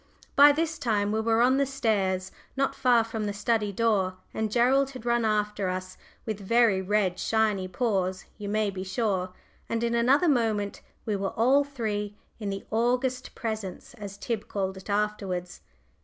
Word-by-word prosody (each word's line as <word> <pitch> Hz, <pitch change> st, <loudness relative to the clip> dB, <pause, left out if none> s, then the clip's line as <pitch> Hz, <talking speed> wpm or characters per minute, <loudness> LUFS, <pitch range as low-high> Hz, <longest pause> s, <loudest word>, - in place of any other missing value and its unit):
By 290 Hz, +1 st, +9 dB
this 320 Hz, +2 st, -1 dB
time 210 Hz, -6 st, +1 dB
we 220 Hz, +1 st, +1 dB
were 225 Hz, +1 st, +3 dB
on 260 Hz, +2 st, +4 dB
the 280 Hz, -, +3 dB
stairs, 195 Hz, -8 st, 0 dB, 0.3 s
not 275 Hz, 0 st, +1 dB
far 245 Hz, -2 st, +3 dB
from 225 Hz, -1 st, -4 dB
the 205 Hz, -, -2 dB
study 210 Hz, 0 st, 0 dB
door, 200 Hz, -3 st, +1 dB, 0.2 s
and 220 Hz, -1 st, -2 dB
Gerald 260 Hz, +4 st, +3 dB
had 255 Hz, -4 st, -10 dB
run 235 Hz, -1 st, +2 dB
after 210 Hz, -2 st, 0 dB
us, 185 Hz, 0 st, -4 dB, 0.3 s
with 215 Hz, -2 st, -3 dB
very 215 Hz, -1 st, +3 dB
red 190 Hz, -2 st, 0 dB
shiny 215 Hz, -4 st, +1 dB
paws, 185 Hz, -2 st, -1 dB
you 205 Hz, -1 st, -5 dB
may 210 Hz, -1 st, +1 dB
be 185 Hz, -1 st, -5 dB
sure, 190 Hz, -2 st, -1 dB, 0.4 s
and 230 Hz, 0 st, -1 dB
in 235 Hz, 0 st, 0 dB
another 260 Hz, +8 st, +4 dB
moment 220 Hz, -7 st, +1 dB, 0.2 s
we 215 Hz, -3 st, 0 dB
were 195 Hz, -1 st, -3 dB
all 260 Hz, +5 st, +4 dB
three 210 Hz, -7 st, -4 dB, 0.2 s
in 210 Hz, -2 st, -3 dB
"the 195 Hz, 0 st, -5 dB
august 245 Hz, +3 st, 0 dB
presence," 215 Hz, -5 st, -5 dB
as 200 Hz, -1 st, -8 dB
Tib 220 Hz, +1 st, -3 dB
called 190 Hz, -1 st, -2 dB
it 190 Hz, +2 st, -11 dB
afterwards. 200 Hz, -4 st, -2 dB
215 Hz, 170 wpm, -27 LUFS, 195-235 Hz, 0.4 s, By